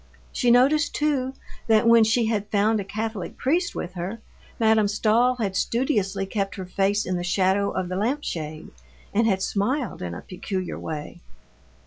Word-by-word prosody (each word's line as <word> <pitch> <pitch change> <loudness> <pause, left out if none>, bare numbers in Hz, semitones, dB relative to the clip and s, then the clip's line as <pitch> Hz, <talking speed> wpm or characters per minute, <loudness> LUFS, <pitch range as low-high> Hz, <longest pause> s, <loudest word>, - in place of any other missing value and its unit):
She 245 - +1
noticed, 280 +5 +4
too, 270 -3 0 0.3
that 220 0 +4
when 230 -1 +7
she 225 +2 +2
had 210 -2 -1
found 215 +1 +2
a - - -2
Catholic 215 -1 -5
priest 340 +6 0
with 175 - -5
her, 185 +5 -5 0.4
Madame 220 -2 +4
Stahl 225 +4 +2
had 205 -6 -2
studiously 205 -4 0
kept 195 0 -2
her 190 - -6
face 195 +3 0
in 180 0 -1
the 175 - -3
shadow 190 +2 +2
of 185 - -2
the 185 - -4
lamp 250 +10 -1
shade 155 -1 -5 0.4
and 225 +2 +3
had 190 -3 +1
smiled 245 +8 -1
in 85 -1 -4
a - - -7
peculiar 185 0 -5
way. 155 +2 -6
210 Hz, 170 wpm, -24 LUFS, 190-235 Hz, 0.4 s, when